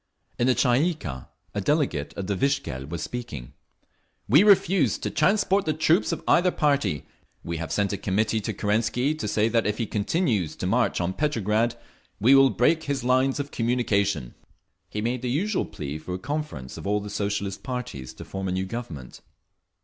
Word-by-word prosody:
In 120 - +3
the 130 - +4
Tsay 125 0 +3
ee 175 +1 +2
kah 65 - -7 0.3
a 105 - -2
delegate 130 - 0
of 100 - -3
the 100 +1 -1
Vikzhel 115 - -1
was 85 -2 -4
speaking: 95 - -6 0.7
"We 140 - +7
refuse 190 - +4
to - - -4
transport 195 +3 +2
the 155 - +1
troops 160 +4 +3
of - - -4
either 180 +1 +5
party…. 140 - 0 0.4
We 85 0 -3
have 80 -2 -5
sent 100 -1 0
a - - -1
committee 110 +3 0
to - - -3
Kerensky 115 +7 +1
to 155 -9 -4
say 105 +1 +2
that 115 -1 +1
if 105 - -1
he 115 - -1
continues 105 - 0
to - - -5
march - - +1
on 90 +1 -1
Petrograd 115 -4 0 0.4
we 120 +7 +5
will 135 0 +7
break 160 +7 +2
his 140 -3 -2
lines 130 +3 +2
of 145 0 -4
communication…." 100 - 0 0.6
He 105 - -3
made 120 +2 -1
the 125 - -2
usual 190 - 0
plea 75 +1 -6
for 90 +3 -5
a - - -3
conference 140 - -5
of - - -6
all 105 +1 +2
the 105 0 -7
Socialist 100 -1 -2
parties 125 - -5
to - - -9
form 95 0 -4
a - - -1
new 95 +1 -1
Government…. 95 - -7
115 Hz, 190 wpm, -25 LUFS, 95-140 Hz, 0.7 s, We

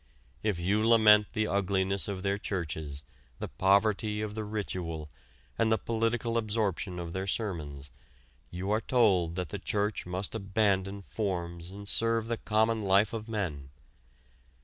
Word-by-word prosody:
If 105 -4 0
you 100 +5 +1
lament 110 -2 +6
the 110 -2 +1
ugliness 95 -1 0
of 95 -2 -4
their 100 0 0
churches, 80 -7 -4 0.3
the - - -4
poverty 105 +2 +2
of 105 -1 -4
the 110 0 -3
ritual, 90 -7 -4 0.5
and 115 -1 +3
the 110 - +4
political 115 +1 0
absorption 105 -4 -1
of 85 -1 -5
their 95 +1 -3
sermons, 75 - -3 0.6
you 95 +3 -4
are 110 +1 +2
told 95 -11 +3
that 90 -4 -3
the - - -5
church 105 -2 -1
must 95 +2 -3
abandon 100 -2 0
forms 85 -5 -3
and 100 +1 -7
serve 115 +1 +2
the 115 - 0
common 110 +1 +1
life 100 +3 +3
of 110 0 -5
men. 80 -11 -3
100 Hz, 150 wpm, -30 LUFS, 90-110 Hz, 0.6 s, lament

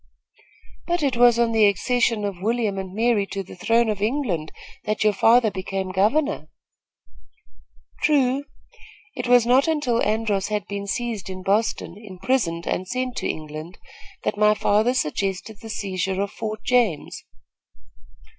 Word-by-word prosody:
"But 345 -2 0
it 270 -3 +1
was 240 0 +5
on 235 -1 +2
the 220 -2 +5
accession 230 +2 +1
of 195 -3 -5
William 220 -2 0
and 190 -1 -6
Mary 220 -1 +1
to 195 0 -4
the 185 - -12
throne 230 +5 +2
of 210 -2 -2
England 210 - -1 0.3
that 215 0 0
your 215 -1 +4
father 225 +2 +4
became 190 0 -4
governor." 280 +11 +1 1.5
"True. 280 -2 +2 0.7
It - - -4
was 245 -1 +5
not 255 +5 +4
until 295 -7 +1
Andros 210 -2 0
had 210 -3 -2
been 200 0 -5
seized 215 -2 -3
in 185 0 -7
Boston, 200 -2 0
imprisoned 185 -3 -1
and 185 - -2
sent 255 +2 -3
to - - -2
England, 155 +3 -6 0.5
that - - -1
my 210 0 +5
father 215 +4 +2
suggested 195 - -2
the 225 - -9
seizure 190 -2 -2
of 200 0 -1
Fort 215 -1 -5
James. 235 -11 0
215 Hz, 145 wpm, -23 LUFS, 195-240 Hz, 1.5 s, was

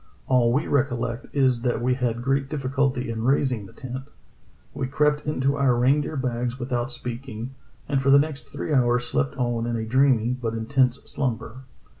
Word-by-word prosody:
All 125 -2 +4
we 140 +6 +1
recollect 125 -2 -1
is 130 -4 +2
that 120 -2 0
we 125 +1 +1
had 120 -2 -1
great 135 +1 0
difficulty 135 -3 -1
in 110 -1 -4
raising 125 -5 +1
the - - -15
tent. 130 0 -7 0.7
We 130 - -2
crept 150 +2 +1
into 140 -1 +1
our 135 -3 +3
rein 130 +5 +3
deer 155 - -5
bags 125 -2 -2
without 120 0 -2
speaking, 120 0 -6 0.3
and 135 -1 +1
for 135 - +1
the 140 - +8
next 145 0 -1
three 155 - -4
hours 120 -2 +3
slept 140 0 -1
on 120 -2 -1
in 120 - -1
a 110 -1 -2
dreamy 125 -1 +3
but 120 -3 -3
intense 125 +2 +1
slumber. 130 -1 -3
130 Hz, 180 wpm, -24 LUFS, 120-135 Hz, 0.7 s, the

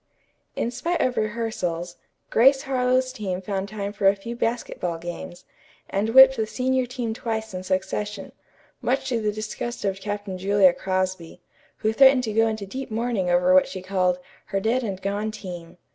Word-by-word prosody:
In 235 - -1
spite 340 +8 -2
of 255 -1 +1
rehearsals, 210 -6 -2 0.3
Grace 270 +4 +5
Harlowe's 255 -1 +1
team 195 -6 -3
found 195 +1 -3
time 205 -1 -4
for 200 -1 +1
a 195 - +5
few 230 +4 -7
basketball 230 -7 -2
games, 175 +1 -8 0.5
and 205 +3 0
whipped 265 +2 +8
the 220 -1 0
senior 255 +3 0
team 240 -3 -3
twice 220 -2 -4
in 185 - -4
succession, 190 +2 -3 0.5
much 260 +3 0
to 235 -3 0
the 210 -1 0
disgust 215 +2 -5
of 195 -1 -2
Captain 205 -2 -4
Julia 195 -1 +4
Crosby, 185 -3 -2 0.4
who 220 0 0
threatened 265 +1 +6
to 220 -3 -3
go 225 +1 +4
into 220 -2 -3
deep 260 +7 -6
mourning 220 -4 -1
over 180 +1 +4
what 185 - +6
she 185 -1 -7
called 185 -1 +1 0.3
"her 195 - -2
dead 230 +6 +1
and 195 -4 -3
gone 200 +2 -2
team." 175 -5 -8
210 Hz, 175 wpm, -24 LUFS, 185-235 Hz, 0.5 s, whipped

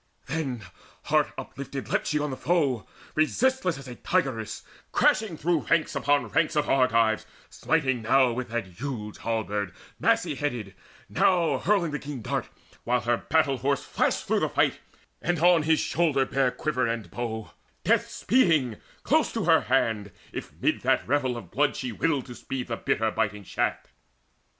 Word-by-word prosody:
Then 135 -9 -3 0.4
heart - - +2
uplifted 135 0 -6
leapt - - 0
she 150 - +1
on 150 -1 -1
the - - -3
foe, 140 -6 0 0.3
Resistless 185 - +1
as 135 -1 -10
a 125 - -6
tigress, 130 - -1 0.3
crashing 210 -7 +2
through 165 0 0
Ranks 160 -2 +2
upon 145 +1 +2
ranks 155 - +1
of 150 -1 +1
Argives, 115 -4 +3 0.2
smiting 130 -7 0
now 125 +2 +4
With 125 0 -4
that 120 -1 -2
huge 105 +2 -6
halberd 105 -4 -2 0.2
massy - - +2
headed, 120 -9 -3 0.3
now 175 -3 +2
Hurling 195 -6 +2
the 150 - -3
keen 140 -5 -7
dart, - - -2 0.3
while 125 +1 +1
her 120 0 +1
battle 155 -2 +1
horse 140 +2 0
Flashed - - 0
through - - +2
the - - 0
fight, - - +1 0.4
and 175 0 0
on 170 +1 +5
his 155 0 +3
shoulder 150 -6 +1
bare 135 -1 +1
Quiver 130 -2 -1
and 115 -2 -3
bow 110 -2 -4 0.3
death - - +2
speeding, 160 - +2 0.3
close - - +2
to - - -1
her - - +5
hand, 105 -3 0 0.2
If - - -6
mid - - +1
that - - +1
revel 130 -2 +1
of 120 - -10
blood 145 +3 +2
she 125 -2 -3
willed 140 +4 0
to 125 - -9
speed 125 0 -5
The 115 - -1
bitter 110 0 0
biting 105 -2 -1
shaft. - - -2
135 Hz, 165 wpm, -27 LUFS, 115-155 Hz, 0.4 s, on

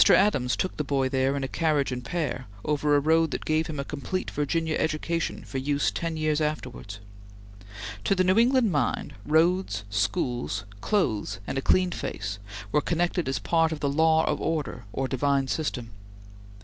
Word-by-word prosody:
Adams 130 -12 +3
took 185 - -2
the 150 - 0
boy 135 -2 +1
there 135 +1 +1
in 140 - -2
a - - -1
carriage 150 -2 +1
and 125 -1 -4
pair, 130 -3 -3 0.2
over 150 0 +2
a - - +5
road 160 +2 +3
that - - -4
gave 155 +1 +1
him 150 -3 -5
a 140 - -2
complete 150 +7 -3
Virginia 160 +2 0
education 160 +1 -1
for 135 - -4
use 140 +1 +1
ten 165 -1 -3
years 155 0 +1
afterwards. 125 -9 -4 1.1
To 195 - +3
the 185 - +3
New 185 +4 +4
England 245 -2 +4
mind, 145 - 0
roads, 170 - +2
schools, 105 - -1 0.2
clothes, 110 - 0
and - - -4
a 135 - 0
clean 185 +5 +3
face 100 - -4 0.3
were 150 - +3
connected 175 -1 0
as 135 - 0
part 165 -1 +2
of 155 - -3
the 145 - 0
law 160 +2 +4
of - - -1
order 150 -8 -2
or 135 +4 -1
divine 135 +1 +1
system. 125 -6 -2
150 Hz, 175 wpm, -27 LUFS, 135-165 Hz, 1.1 s, a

